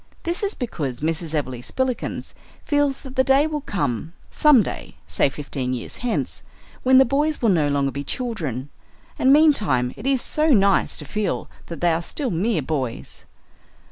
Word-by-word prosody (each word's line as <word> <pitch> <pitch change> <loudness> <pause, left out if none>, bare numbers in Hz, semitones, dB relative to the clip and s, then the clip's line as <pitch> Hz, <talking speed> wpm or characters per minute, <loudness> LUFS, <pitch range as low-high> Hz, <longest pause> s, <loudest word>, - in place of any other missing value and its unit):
This 340 +1 -2
is 405 0 -1
because 145 - -4
Mrs. 160 0 -2
Everleigh 130 -5 -3
Spillikins 260 - -3 0.3
feels 290 -2 +1
that 265 -1 -10
the 260 - +4
day 270 +2 +4
will 305 -2 -2
come 165 - -2 0.2
some 295 -7 +5
day - - -7
say - - +2
fifteen 135 -3 -4
years 120 - -6
hence 240 -2 -2 0.4
when 260 0 +5
the 265 - +7
boys 295 +5 0
will 230 - +2
no 160 -6 +3
longer 140 -1 +1
be 140 +1 -5
children, 150 - -4 0.5
and 260 - +4
meantime 210 - +4
it 220 - -6
is 270 -2 +2
so 310 +1 +1
nice 200 -1 +2
to - - -7
feel 210 -3 -2 0.2
that 170 - -7
they 175 -1 +3
are 165 - 0
still 255 - -3
mere 180 -1 0
boys. 130 -5 -4
200 Hz, 170 wpm, -22 LUFS, -, 0.5 s, the